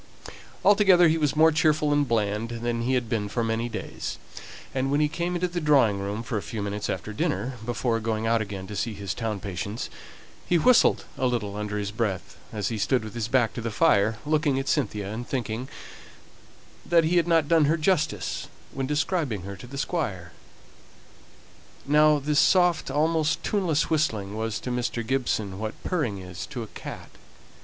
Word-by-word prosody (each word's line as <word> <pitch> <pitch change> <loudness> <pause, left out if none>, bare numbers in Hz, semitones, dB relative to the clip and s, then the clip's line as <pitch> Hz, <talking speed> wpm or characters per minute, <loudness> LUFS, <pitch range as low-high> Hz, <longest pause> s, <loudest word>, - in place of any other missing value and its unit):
Altogether, 195 -4 +6
he 160 - +2
was 150 -2 +1
more 160 +1 +6
cheerful 150 -1 +2
and 145 -1 +2
bland 110 -1 0
than 120 -1 -1
he 130 +3 +1
had 125 -2 0
been 110 -2 -1
for 115 +3 -1
many 115 +1 -1
days; - - -5 0.6
and 130 0 0
when 145 +1 +2
he 150 - +3
came 170 +3 -2
up - - -2
into - - +3
the 175 - -1
drawing 135 -10 +4
room 100 +3 -3
for 120 -3 -2
a - - -7
few 110 - -6
minutes 105 +1 -3
after 110 - -4
dinner, 105 +4 -1
before 120 0 -1
going 110 0 -2
out 115 0 +2
again 100 -3 -5
to 105 - -7
see 110 +2 -2
his 100 -3 -4
town 110 +1 -3
patients, 100 +3 -5 0.6
he 175 - +3
whistled 250 +9 +4
a 130 - +2
little 110 -5 -2
under 105 0 -3
his 100 -1 -3
breath, 105 -4 -3 0.2
as 105 -2 -2
he 115 -2 -3
stood 125 +3 +1
with 110 - -8
his 115 -2 -2
back 120 -2 +2
to - - -5
the 115 - -2
fire, 105 +1 +3
looking 150 -2 +1
at 135 - -2
Cynthia, 105 -7 -1
and 120 +2 -5
thinking 125 -1 -3 1.1
that 170 -1 +4
he 170 +3 +2
had 170 - +3
not 165 -3 +3
done 165 -2 +4
her 155 +3 +2
justice 155 - 0 0.2
when 135 -1 -3
describing 150 - -1
her 100 +1 -6
to 125 - -11
the 140 +3 -8
Squire. 100 - -2 1.5
Now 150 +1 +5
this 145 +1 +1
soft, 175 -5 +3
almost 155 +2 +1
tuneless 175 -8 0
whistling, 110 -11 0
was 110 0 -2
to 125 - -4
Mr. 120 -1 -2
Gibson 110 -6 -1
what 110 0 -4
purring 150 - -1
is 90 0 -7
to 125 -6 -5
a - - -8
cat. - - -9
120 Hz, 190 wpm, -26 LUFS, 105-150 Hz, 1.5 s, Altogether